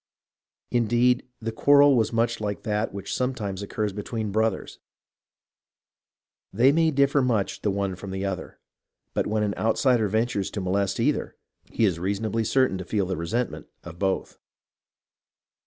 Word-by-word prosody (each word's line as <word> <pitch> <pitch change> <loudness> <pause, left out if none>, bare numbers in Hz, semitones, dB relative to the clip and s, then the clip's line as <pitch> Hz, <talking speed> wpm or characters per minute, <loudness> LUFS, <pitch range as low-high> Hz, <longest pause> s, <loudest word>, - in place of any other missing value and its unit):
Indeed, 120 +1 +2
the 115 0 -3
quarrel 140 +4 +5
was 115 -3 +2
much 115 0 0
like 105 -1 -3
that 105 -1 -1
which 100 0 -6
sometimes 110 -7 -2
occurs 105 0 -3
between 105 +1 -4
brothers. 110 -1 -1 1.7
They 120 +7 +4
may 160 +2 +3
differ 140 -1 +3
much 115 -6 0
the 105 - 0
one 100 -1 -1
from 100 +2 -9
the 95 +1 -3
other, 95 -2 -5 0.5
but - - 0
when 105 0 0
an 105 -1 0
outsider 115 0 +2
ventures 110 -1 0
to - - -5
molest 95 +2 0
either, 140 +6 0 0.3
he 115 - +1
is 90 -5 0
reasonably 100 +4 -1
certain 130 -4 +2
to - - -4
feel 100 +2 -1
the 95 +1 -2
resentment 110 +10 -3 0.2
of 85 0 -10
both. 95 -1 -2
110 Hz, 150 wpm, -25 LUFS, 100-120 Hz, 1.7 s, quarrel